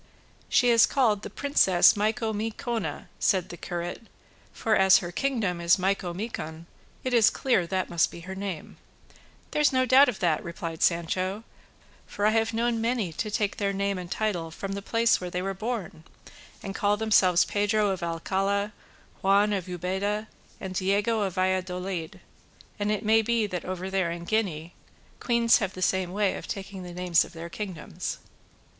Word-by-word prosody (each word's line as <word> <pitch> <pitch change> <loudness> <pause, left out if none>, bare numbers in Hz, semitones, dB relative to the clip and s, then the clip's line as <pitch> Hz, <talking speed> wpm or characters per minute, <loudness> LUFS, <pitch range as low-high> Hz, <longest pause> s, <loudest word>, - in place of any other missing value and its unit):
"She 245 -1 +4
is 230 -1 +6
called 225 -7 +2
the - - -7
Princess 190 -11 +4
Micomicona," 220 - -2
said 185 -3 +1
the - - -7
curate; 175 +6 -5 0.4
"for 220 -1 0
as 190 0 +6
her 175 -1 -4
kingdom 205 -6 -1
is 170 +2 +4
Micomicon, 185 -3 -3 0.4
it 255 - -2
is 230 -3 +6
clear 220 -10 +1
that 185 +1 -1
must 170 -2 +3
be 170 - -10
her 190 +3 -7
name." 190 -4 -6 0.7
"There's 300 -1 +3
no 255 -1 +2
doubt 260 +3 +6
of 230 - -3
that," 165 -4 +1
replied 165 -1 -6
Sancho, 185 +4 0 0.6
"for 205 - -2
I 215 - +5
have 225 0 +1
known 230 0 0
many 225 -7 -1
to 215 +7 -3
take 210 -1 -1
their 200 -1 0
name 200 -1 -1
and 180 -1 -7
title 185 -6 -2
from 195 +4 -6
the 200 0 -4
place 230 +1 +2
where 180 - -4
they 180 +1 -3
were 195 0 -2
born 195 -6 -5 0.6
and 195 - -5
call 205 +1 +1
themselves 190 -5 +4
Pedro 205 0 +1
of 190 - -4
Alcala, 195 +5 -1 0.5
Juan 200 +2 +3
of 190 -3 -2
Ubeda, 190 +4 -2 0.3
and 190 -2 -6
Diego 200 +4 +1
of 190 -3 -2
Valladolid; 185 -2 -2 0.6
and 205 +1 0
it 210 0 -2
may 220 +1 +5
be 230 0 +1
that 180 -4 -5
over 185 0 -4
there 190 -3 +1
in 170 0 -5
Guinea 175 -5 -2 0.5
queens 235 -1 +3
have 195 -4 -2
the 185 - -7
same 185 0 +1
way 200 0 +1
of - - -9
taking 195 -1 -6
the 180 -1 -8
names 175 -1 +2
of - - -12
their 170 +1 -7
kingdoms." 185 -3 -5
195 Hz, 170 wpm, -27 LUFS, 180-220 Hz, 0.7 s, is